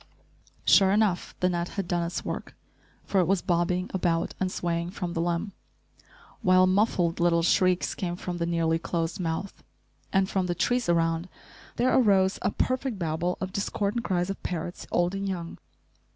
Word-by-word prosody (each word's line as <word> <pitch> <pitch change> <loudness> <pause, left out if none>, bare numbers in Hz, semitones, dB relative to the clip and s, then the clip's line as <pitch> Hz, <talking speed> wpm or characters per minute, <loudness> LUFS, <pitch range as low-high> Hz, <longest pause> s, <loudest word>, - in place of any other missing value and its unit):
Sure 195 -2 +6
enough, 200 -3 +1
the 180 - +4
net 175 0 -2
had 195 -3 -2
done 175 0 0
its 170 +1 -3
work, - - -5 0.5
for 195 - +1
it 175 - +1
was 195 -1 +1
bobbing 180 0 +1
about 170 -3 0
and 185 -1 0
swaying 170 -1 -2
from 180 -2 -4
the 165 - -1
limb, 175 +4 -1 0.9
while 185 0 +5
muffled 185 -3 +2
little 170 -1 +3
shrieks 185 +1 +2
came 175 -2 -3
from 180 0 -5
the 170 - 0
nearly 165 -1 +1
closed 165 +2 -2
mouth; 170 +3 -3 0.5
and 190 -1 +3
from 190 -2 -1
the 175 - -1
trees 245 +4 0
around 165 +1 +1 0.5
there 250 +2 +2
arose 195 -6 +3
a - - +1
perfect 255 +1 -1
babel 170 +1 -1
of 185 0 -4
discordant 205 +3 -1
cries 180 0 0
of 195 - -7
parrots, 175 0 -5
old 175 +1 +1
and 195 0 -2
young. 170 -3 -5
180 Hz, 170 wpm, -27 LUFS, 170-195 Hz, 0.9 s, Sure